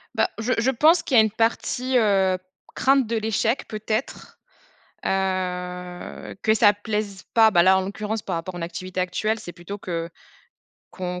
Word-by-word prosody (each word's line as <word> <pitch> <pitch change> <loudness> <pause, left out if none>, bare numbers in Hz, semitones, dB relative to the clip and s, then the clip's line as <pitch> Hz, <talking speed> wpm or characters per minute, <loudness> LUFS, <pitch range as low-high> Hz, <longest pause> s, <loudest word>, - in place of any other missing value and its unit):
Bah, - - +2
je 245 +3 0
je 250 +3 +2
pense 315 +7 +4
qu'il 255 - +2
y - - +10
a 220 - +7
une 215 - 0
partie, 245 +3 0
heu, 195 -4 +3 0.4
crainte 270 -3 +3
de 230 0 -1
l'échec, 220 +3 0
peut-être, 215 +3 -4 0.7
heu, 180 -2 -3
que 220 0 +3
ça 210 -2 +6
plaise 205 -2 -4
pas. 225 -1 +6
Bah 175 -5 +5
là, 190 +1 +5
en - - 0
l'occurrence, 210 +2 -4
par 180 -3 -3
rapport 175 +2 -5
à - - -6
mon - - -5
activité 185 +2 -5
actuelle, 215 +5 -1
c'est 175 - -9
plutôt 180 +4 -8
que 170 -3 -4 0.8
qu'on 180 -1 -5
205 Hz, 175 wpm, -24 LUFS, 185-225 Hz, 0.8 s, y